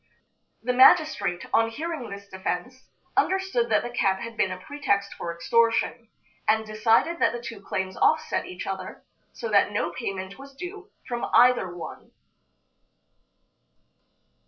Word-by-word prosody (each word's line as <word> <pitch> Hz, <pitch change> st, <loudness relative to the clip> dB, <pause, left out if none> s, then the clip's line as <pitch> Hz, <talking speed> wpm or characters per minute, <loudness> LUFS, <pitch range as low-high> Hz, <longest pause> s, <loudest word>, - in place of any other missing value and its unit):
The 250 Hz, +1 st, 0 dB
magistrate, 260 Hz, -, +5 dB
on 225 Hz, 0 st, +4 dB
hearing 305 Hz, +1 st, -5 dB
this 200 Hz, 0 st, -9 dB
defense, 190 Hz, +6 st, -5 dB, 0.3 s
understood 380 Hz, -11 st, +1 dB
that 215 Hz, -, +3 dB
the 240 Hz, -, -5 dB
cat 195 Hz, -5 st, +1 dB
had 230 Hz, +2 st, -7 dB
been 190 Hz, -, +1 dB
a 185 Hz, -, -4 dB
pretext 200 Hz, -5 st, -1 dB
for 170 Hz, -, -5 dB
extortion, 230 Hz, +6 st, +1 dB, 0.4 s
and 220 Hz, 0 st, +3 dB
decided 225 Hz, +10 st, +2 dB
that -, -, +3 dB
the 240 Hz, -, -4 dB
two 230 Hz, -3 st, -8 dB
claims 190 Hz, -1 st, -3 dB
offset 315 Hz, 0 st, +2 dB
each 180 Hz, -, -7 dB
other, 190 Hz, -1 st, -6 dB, 0.3 s
so 235 Hz, -, -6 dB
that 205 Hz, 0 st, +4 dB
no 170 Hz, -4 st, -1 dB
payment 190 Hz, +4 st, -5 dB
was 275 Hz, 0 st, -12 dB
due 380 Hz, +6 st, -8 dB, 0.2 s
from 240 Hz, -1 st, -3 dB
either 245 Hz, -6 st, +5 dB
one. 175 Hz, -, -9 dB
225 Hz, 140 wpm, -26 LUFS, 195-260 Hz, 0.4 s, magistrate